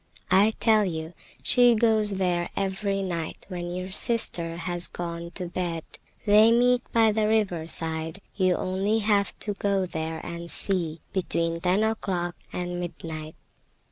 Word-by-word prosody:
I 205 +3 +5
tell 220 -2 +4
you, 160 -3 -4 0.3
she 245 -2 +5
goes 215 -2 +3
there 175 -2 0
every 195 0 -1
night 170 -4 -4
when 175 -2 -4
your 185 +1 -5
sister 175 -6 +2
has 175 0 -2
gone 170 -1 -5
to 180 - -3
bed. 170 -2 -3 0.4
They 215 +2 +6
meet 245 +1 +4
by 225 -1 +4
the 210 0 +1
river 195 -7 +1
side; 160 +2 -2 0.2
you 185 -2 +3
have - - -3
only 195 +4 0 0.4
to 205 - -3
go 200 -1 0
there 160 -2 -4
and 170 0 -6
see, 170 -5 0
between 170 -3 -1
ten 185 +4 +2
o'clock 185 -5 -1 0.2
and 175 0 -3
midnight." 160 -3 -6
185 Hz, 145 wpm, -26 LUFS, 170-210 Hz, 0.4 s, They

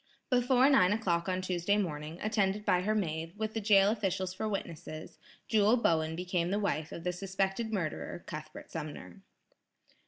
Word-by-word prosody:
Before 250 +1 +4
nine 210 -9 +5
o'clock 180 -5 0
on 185 0 -1
Tuesday 185 +2 +1
morning, 160 -4 -3
attended 210 -1 +1
by 180 - +3
her 215 +3 0
maid, 165 -2 -2
with 220 0 -2
the 225 - -2
jail 200 -1 +5
officials 190 -4 -1
for 215 +3 -3
witnesses, 160 -5 -6 0.3
Jewel 215 +2 +4
Bowen 160 -7 +1
became 180 0 -1
the 200 - +1
wife 165 -7 -1
of 165 - -7
the 180 0 -1
suspected 195 +4 -2
murderer, 175 -3 -3
Cuthbert 155 -1 -8
Sumner. 150 - -7
185 Hz, 160 wpm, -31 LUFS, 170-210 Hz, 0.3 s, nine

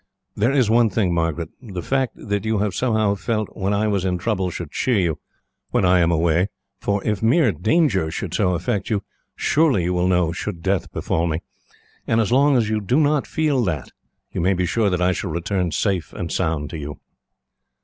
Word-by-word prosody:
"'There 115 +5 +2
is 130 -5 +3
one 115 +1 +4
thing, 95 -3 0
Margaret. 85 -1 -1
The 95 -8 -6
fact 135 -2 0
that 100 -1 -3
you 110 0 0
have 100 -1 0
somehow 110 -2 +1
felt 110 +2 -3
when 100 -1 -1
I 105 +1 +1
was 100 -3 0
in 90 -1 0
trouble 95 -1 -1
should 85 -3 -6
cheer 125 -4 +1
you, 85 -6 0 0.5
when - - +1
I 90 0 +5
am 85 -1 +3
away, 85 +2 +2 0.3
for 100 -1 -1
if 105 -2 0
mere 120 +3 +4
danger 95 - +1
should - - -5
so 90 -1 +2
affect 90 +3 -2
you, 105 -3 0 0.3
surely 145 - +2
you 90 +2 0
will 90 0 +1
know 90 -3 +2
should 85 0 -5
death 95 -1 0
befall 85 +1 -1
me; 80 0 -2 0.6
and 115 - +2
as 110 -1 +1
long 140 +2 +4
as 115 -3 +2
you 110 0 0
do 125 +8 +2
not 150 -2 +2
feel 150 -5 +1
that, 75 -8 -3 0.4
you - - -2
may 95 +3 +2
be 90 0 0
sure 105 +4 +1
that 90 -1 0
I 90 - +3
shall 95 +1 -3
return 90 +2 -1
safe 90 +2 -1
and 85 -2 -5
sound 80 -5 -1
to 80 - -5
you.' 75 0 -7
95 Hz, 210 wpm, -22 LUFS, 85-110 Hz, 0.6 s, I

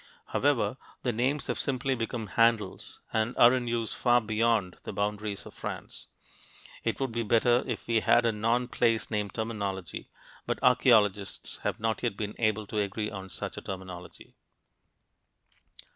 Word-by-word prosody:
However, - - +1 0.3
the 125 - +1
names 130 +5 0
have 120 -2 -2
simply 135 0 +1
become 115 -2 -3
handles 115 -2 +1
and 110 +2 0
are 120 +1 +8
in 125 -2 -1
use 115 -1 -1
far 120 -1 +4
beyond 110 -3 +1
the - - -6
boundaries 105 0 -2
of - - -11
France. - - -7 0.8
It - - -1
would 135 -3 -1
be 120 +1 -1
better 120 +2 +3
if 120 -4 -4
we 115 -1 +2
had 120 +2 +4
a 115 - +4
non 115 +3 +1
place 115 -2 +1
name 105 -2 -1
terminology, 100 -5 -4 0.4
but - - 0
archeologists 110 -6 +3
have - - -2
not 110 -1 -1
yet 100 - -1
been 105 -1 -3
able 110 -2 +1
to 105 +1 -3
agree 105 +1 -2
on 95 -2 -7
such - - -5
a - - -5
terminology. 90 -2 -8
110 Hz, 160 wpm, -29 LUFS, 105-120 Hz, 0.8 s, are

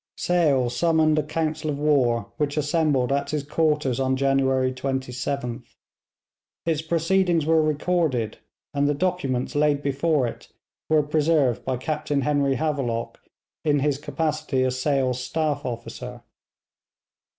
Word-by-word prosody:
Sale 145 -9 +2
summoned 155 +2 +3
a - - +3
council 155 0 -2
of 145 - -2
war, 135 -6 +1
which 145 0 -1
assembled 145 -4 +1
at 140 0 0
his 150 -2 -2
quarters 150 -4 0
on 130 0 +1
January 135 -1 +2
27th. 130 -1 -4 0.9
Its 160 -2 0
proceedings 170 0 +1
were 160 0 +4
recorded, 155 -7 0 0.3
and 145 0 +1
the 145 - +1
documents 140 -7 -1
laid 145 -1 +2
before 140 0 +1
it 115 - -6 0.4
were 155 -1 +4
preserved 150 -4 +1
by 130 -1 -1
Captain 150 +1 -1
Henry 140 -1 +1
Havelock 125 -5 -2 0.4
in 145 -2 +2
his 145 -1 0
capacity 150 -3 -1
as 130 0 -1
Sale's 130 -3 0
staff 150 +2 -1
officer. 120 +1 -7
145 Hz, 130 wpm, -24 LUFS, 130-155 Hz, 0.9 s, were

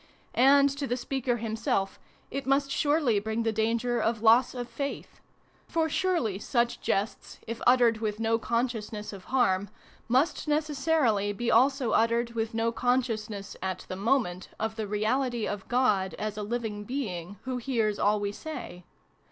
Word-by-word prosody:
And 275 +2 +6
to 280 - -2
the 245 - -1
speaker 250 -1 -1
himself 220 -3 -1 0.3
it 275 0 -4
must 275 0 +2
surely 290 -7 +2
bring 220 +2 -2
the 225 - +1
danger 230 +2 0
of 225 0 0
loss 235 +4 +5
of 245 -1 -4
faith. 275 +4 -6 0.5
For 320 -1 0
surely 305 - 0
such 240 +2 0
jests, 200 +2 -2
if 230 +1 -6
uttered 240 -3 +5
with 215 -1 -2
no 225 0 +1
consciousness 225 -3 -2
of 190 -2 -10
harm, 205 -7 +1 0.4
must 265 +7 +1
necessarily 295 -8 +1
be 235 +4 -1
also 265 +1 +3
uttered 235 +1 +2
with 225 -1 -3
no 230 0 +1
consciousness, 225 -5 -1
at 185 -1 -3
the 185 - -3
moment, 195 -3 0
of 220 0 -2
the 220 -2 -3
reality 230 +3 0
of 205 -2 -5
God, 210 -7 +2
as 215 0 -3
a 210 - -4
living 215 -1 -3
being, 200 -7 -4
who 255 -1 -3
hears 230 -5 0
all 210 +1 +3
we 205 0 -2
say. 235 - -7
230 Hz, 160 wpm, -28 LUFS, 210-255 Hz, 0.5 s, And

